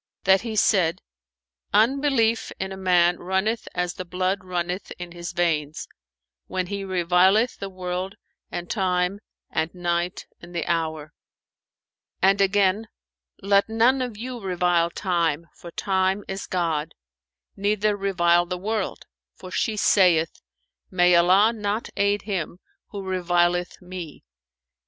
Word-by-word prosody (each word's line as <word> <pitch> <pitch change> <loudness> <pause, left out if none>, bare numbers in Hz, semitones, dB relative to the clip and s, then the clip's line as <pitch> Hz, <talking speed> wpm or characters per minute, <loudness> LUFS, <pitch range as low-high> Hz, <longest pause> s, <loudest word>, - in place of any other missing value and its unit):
that 190 0 +5
he 225 -2 -5
said, 185 -6 +3 0.8
'Unbelief 230 0 +2
in 190 0 -3
a - - -5
man 180 -2 +3
runneth 190 +5 -1
as 180 -1 -1
the 185 - -6
blood 185 +2 -1
runneth 180 +1 -3
in 175 -1 -7
his 175 0 -6
veins, 160 -4 -1 0.6
when 185 -1 -2
he 200 +2 -4
revileth 185 +5 +3
the 195 - -5
world 185 0 -4 0.3
and 175 0 -5
Time 185 -1 0 0.3
and 160 +1 -1
night 175 0 -2 0.2
and 175 +1 -12
the 170 - -1
Hour.' 160 -2 -2 1.1
And 195 +1 +4
again, 200 +2 +2 0.6
'Let 200 +1 +3
none 235 +4 +3
of 245 -4 -4
you 245 +2 -6
revile 180 -3 +1
Time, 170 -3 -1
for 170 - -11
Time 190 +2 0
is 195 +1 -5
God; 165 -4 -1 0.6
neither 210 +1 +1
revile 175 -3 +2
the 180 0 -3
world, 210 +2 -3 0.3
for 185 - -11
she 215 +2 -1
saith, 175 -6 +3 0.5
'May 180 -1 +4
Allah 190 +6 +5
not 210 0 -2
aid 200 0 +1
him 190 -5 -3 0.3
who 200 -2 -7
revileth 175 -1 0
me! 180 -4 -8
185 Hz, 130 wpm, -24 LUFS, 175-200 Hz, 1.1 s, that